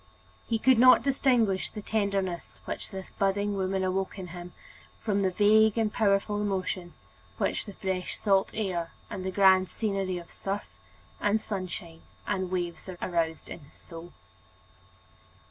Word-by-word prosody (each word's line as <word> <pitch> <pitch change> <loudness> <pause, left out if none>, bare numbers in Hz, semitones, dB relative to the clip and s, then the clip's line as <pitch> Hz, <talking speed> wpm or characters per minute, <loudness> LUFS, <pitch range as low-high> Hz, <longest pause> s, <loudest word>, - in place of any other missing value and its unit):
He 230 - +1
could 255 +1 +4
not 255 -1 +8
distinguish 250 -8 +2
the 210 - -8
tenderness 200 -5 -2
which - - -5
this 190 -2 -8
budding 200 +1 0
woman 190 0 0
awoke 190 +2 -1
in 185 -2 -6
him 175 +1 -8 0.5
from 200 -3 0
the 190 - +3
vague 215 +3 +4
and 220 -2 +1
powerful 205 0 +2
emotion 185 -3 -2 0.4
which - - -1
the 205 - -7
fresh 185 -1 -3
salt 195 -2 +2
air 180 -6 -2 0.2
and 185 - -4
the 190 - -2
grand 190 -1 +5
scenery 195 -2 -1
of 170 -1 -10
surf 200 +1 -4 0.5
and 210 +1 +2
sunshine 180 -5 -6 0.2
and 190 -3 -1
waves 175 0 -3
aroused 165 -2 -1
in - - -7
his 140 -2 -19
soul. 170 0 -11
195 Hz, 145 wpm, -28 LUFS, 185-210 Hz, 0.5 s, not